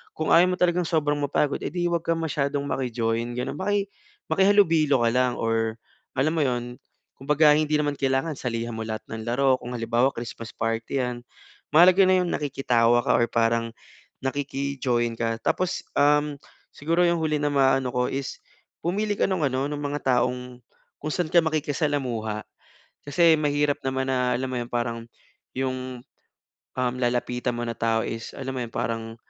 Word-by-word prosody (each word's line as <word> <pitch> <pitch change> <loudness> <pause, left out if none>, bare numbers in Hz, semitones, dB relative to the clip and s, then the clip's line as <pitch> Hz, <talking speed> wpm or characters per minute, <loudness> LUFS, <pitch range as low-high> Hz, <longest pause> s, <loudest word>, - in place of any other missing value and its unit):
Kung 155 - 0
ayaw 175 +2 +7
mo 180 - 0
talagang 180 0 +2
sobrang 150 -3 +1
mapagod, 145 +1 0
eh - - -2
'di 175 0 -2
huwag 170 -1 0
kang 165 0 +1
masyadong 140 -2 -1
maki-join 115 -3 -1
gano'n. 125 +2 -2
Maki 205 -1 0 0.4
makihalubilo 165 - +4
ka 115 - +4
lang 125 -1 +1
or 115 0 0 0.4
alam 155 +5 +2
mo 160 - +1
'yon, 125 -2 -2 0.4
kumbaga, 150 +2 +4
hindi 155 0 +1
naman 145 -1 0
kailangan 135 +4 0
salihan 115 -2 -3
mo 110 - -4
lahat 110 -1 -5
ng 110 0 -6
laro, 130 +3 +2
kung 120 - -7
halimbawa, 120 +3 +2
Christmas 115 -1 -7
party 115 +3 -2
'yan, 125 -1 -4 0.5
mahalaga 180 +4 +7
na 185 - +5
'yung 180 - -1
nakikitawa 120 -4 +2
ka - - +3
or 120 - +1
parang 115 0 +1 0.6
nakiki-join 135 -3 -1
ka. 115 0 -1
Tapos, 185 -1 0
um, 145 0 +3 0.4
siguro 165 +4 +1
'yung 170 -1 +1
huli 155 -1 +1
na 145 0 0
ma-ano 135 -2 +2
ko 125 0 0
is 135 0 -5 0.4
pumili 205 +5 0
ka - - +1
nung 180 -6 0
ano, 135 +2 -1
nung 145 -1 -4
mga 145 0 -3 0.2
taong, 125 0 -3 0.4
kung 155 +1 -3
saan 175 -3 -1
ka 170 - +5
makikisalamuha. 145 -8 -1 0.6
Kasi 160 +3 +4
mahirap 145 -1 +1
naman 130 0 -1
na, 125 -1 +1
alam 130 +2 -2
mo 130 - -3
'yun, 120 0 -5
parang 115 -1 -2 0.5
'yung, 130 -1 -3 0.8
um, 125 -1 0
lalapitan 125 0 -1
mo 120 - -3
na 115 - -3
tao 115 0 +1
is, 115 0 -5
alam 130 -1 -5
mo 130 - -3
'yon, 115 - -6
parang 115 0 -3
135 Hz, 170 wpm, -25 LUFS, 120-150 Hz, 0.8 s, ayaw